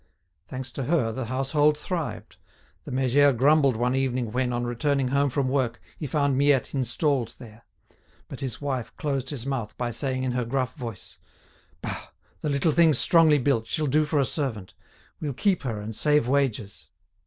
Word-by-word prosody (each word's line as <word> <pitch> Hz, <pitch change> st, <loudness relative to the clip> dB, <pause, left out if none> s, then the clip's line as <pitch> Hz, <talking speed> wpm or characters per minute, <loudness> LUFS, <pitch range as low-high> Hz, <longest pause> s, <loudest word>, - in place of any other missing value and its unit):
Thanks 130 Hz, 0 st, -5 dB
to 135 Hz, +1 st, -4 dB
her, 140 Hz, -7 st, +1 dB
the 130 Hz, +2 st, -4 dB
household 145 Hz, +5 st, +2 dB
thrived. 165 Hz, 0 st, -5 dB, 0.5 s
The -, -, -7 dB
méger 135 Hz, +1 st, +3 dB
grumbled 140 Hz, 0 st, +4 dB
one 120 Hz, +3 st, 0 dB
evening 130 Hz, -3 st, -1 dB
when, 125 Hz, +1 st, 0 dB
on 120 Hz, 0 st, -1 dB
returning 135 Hz, +2 st, 0 dB
home 140 Hz, +1 st, +2 dB
from 135 Hz, +1 st, 0 dB
work, 130 Hz, -3 st, 0 dB, 0.2 s
he 150 Hz, -, -5 dB
found 140 Hz, -1 st, +1 dB
Miette 140 Hz, -2 st, +3 dB
installed 135 Hz, 0 st, 0 dB
there. 115 Hz, -2 st, -14 dB, 0.6 s
But -, -, -8 dB
his 130 Hz, -4 st, -4 dB
wife 130 Hz, -5 st, -3 dB
closed 140 Hz, -4 st, -2 dB
his 130 Hz, -5 st, -3 dB
mouth 130 Hz, -6 st, -3 dB
by 120 Hz, -1 st, -2 dB
saying 130 Hz, +2 st, -2 dB
in 130 Hz, -, 0 dB
her 125 Hz, 0 st, -1 dB
gruff 130 Hz, +1 st, -1 dB
voice: 120 Hz, -5 st, -8 dB, 0.6 s
"Bah, -, -, -5 dB, 0.3 s
the 150 Hz, -, -2 dB
little 140 Hz, +3 st, +2 dB
thing's 160 Hz, -3 st, +5 dB
strongly 160 Hz, -1 st, +5 dB
built, 125 Hz, -4 st, +1 dB
she'll 155 Hz, -, -1 dB
do 150 Hz, +2 st, +2 dB
for 150 Hz, -1 st, 0 dB
a 135 Hz, -, +3 dB
servant; 120 Hz, -, -3 dB, 0.5 s
we'll 145 Hz, -3 st, -3 dB
keep 190 Hz, -, +1 dB
her 115 Hz, -5 st, -3 dB
and 105 Hz, +1 st, -6 dB
save 150 Hz, 0 st, +2 dB
wages." 125 Hz, -7 st, -1 dB
135 Hz, 175 wpm, -26 LUFS, 120-145 Hz, 0.6 s, thing's